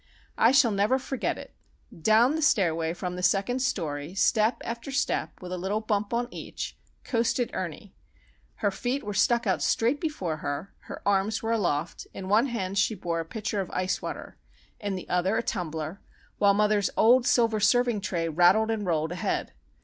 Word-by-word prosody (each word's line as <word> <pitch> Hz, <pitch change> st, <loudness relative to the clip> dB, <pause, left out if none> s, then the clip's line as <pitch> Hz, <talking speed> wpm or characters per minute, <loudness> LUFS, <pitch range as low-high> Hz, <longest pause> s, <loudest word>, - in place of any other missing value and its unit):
I 230 Hz, -, +6 dB
shall 270 Hz, -4 st, +5 dB
never 205 Hz, +6 st, +2 dB
forget 265 Hz, 0 st, -2 dB
it. -, -, -10 dB, 0.4 s
Down 220 Hz, -, +4 dB
the 320 Hz, -, -1 dB
stairway 165 Hz, -, +2 dB
from 180 Hz, 0 st, -4 dB
the 180 Hz, -, -5 dB
second 195 Hz, +7 st, +1 dB
story, 165 Hz, -, -2 dB
step 215 Hz, +3 st, +2 dB
after 235 Hz, +3 st, -5 dB
step, 275 Hz, +1 st, -1 dB
with 180 Hz, -, -7 dB
a 185 Hz, -, -3 dB
little 195 Hz, +4 st, -1 dB
bump 210 Hz, -2 st, -1 dB
on 240 Hz, +1 st, 0 dB
each, -, -, -6 dB, 0.3 s
coasted 240 Hz, 0 st, 0 dB
Ernie. 185 Hz, +2 st, -5 dB, 0.6 s
Her 205 Hz, -, 0 dB
feet 250 Hz, +7 st, -2 dB
were 205 Hz, -, -4 dB
stuck 235 Hz, +4 st, +2 dB
out 190 Hz, -3 st, +1 dB
straight 245 Hz, +6 st, +1 dB
before 190 Hz, -, -2 dB
her, 145 Hz, +5 st, -5 dB
her -, -, -8 dB
arms 200 Hz, +2 st, +1 dB
were 225 Hz, -, -1 dB
aloft, 175 Hz, -8 st, -1 dB
in 190 Hz, -, -6 dB
one 220 Hz, +6 st, +4 dB
hand 200 Hz, -5 st, -2 dB
she 215 Hz, +3 st, +2 dB
bore 170 Hz, -3 st, -2 dB
a 165 Hz, -, -3 dB
pitcher 210 Hz, +3 st, -3 dB
of 185 Hz, -, -6 dB
ice 185 Hz, +1 st, -1 dB
water, -, -, -7 dB, 0.4 s
in 205 Hz, -3 st, -3 dB
the 185 Hz, -, -7 dB
other 185 Hz, +4 st, +1 dB
a 230 Hz, -, 0 dB
tumbler, 160 Hz, -3 st, -4 dB, 0.4 s
while 200 Hz, -1 st, +5 dB
mother's 210 Hz, -1 st, +2 dB
old 245 Hz, +2 st, +5 dB
silver 225 Hz, -3 st, +3 dB
serving 235 Hz, 0 st, +3 dB
tray 170 Hz, -4 st, -2 dB
rattled 180 Hz, +7 st, +4 dB
and 210 Hz, -3 st, -2 dB
rolled 160 Hz, -1 st, 0 dB
ahead. 175 Hz, -, -2 dB
205 Hz, 180 wpm, -27 LUFS, 180-235 Hz, 0.6 s, I